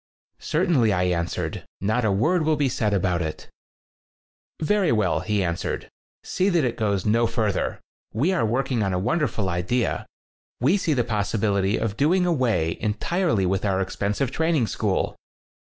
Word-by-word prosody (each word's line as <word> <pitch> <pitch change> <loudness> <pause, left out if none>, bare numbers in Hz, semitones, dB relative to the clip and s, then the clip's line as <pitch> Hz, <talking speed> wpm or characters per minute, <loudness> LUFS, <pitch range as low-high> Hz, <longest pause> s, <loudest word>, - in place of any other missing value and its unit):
"Certainly," 155 - +2
I 90 -1 +1
answered. 85 -1 -2 0.2
"Not 110 +5 0
a 110 - +2
word 160 - +2
will 155 0 +2
be 145 -2 +1
said 115 -4 0
about 90 -3 +1
it." 80 -2 -5 1.1
"Very 190 +1 +2
well," 105 -6 +2
he 105 -2 0
answered. 85 0 -3 0.3
"See 190 +2 0
that 175 -5 +2
it 120 -2 0
goes 100 -4 -1
no 115 +2 +3
further. 110 -4 -1 0.3
We 145 - +1
are 185 - +1
work 125 +5 0
ing 120 -3 +1
on 95 -2 0
a - - 0
wonderful 115 - 0
idea. 95 +8 -1 0.5
We 140 - +3
see 170 -5 0
the 120 - +2
possibility 105 -2 0
of 110 -2 -2
doing 180 +6 +3
away 120 - +1
entirely 110 - 0
with 95 +2 0
our 95 -2 +1
expensive 100 +6 -1
training 160 -4 +1
school!" 105 -3 -1
110 Hz, 160 wpm, -24 LUFS, 100-150 Hz, 1.1 s, no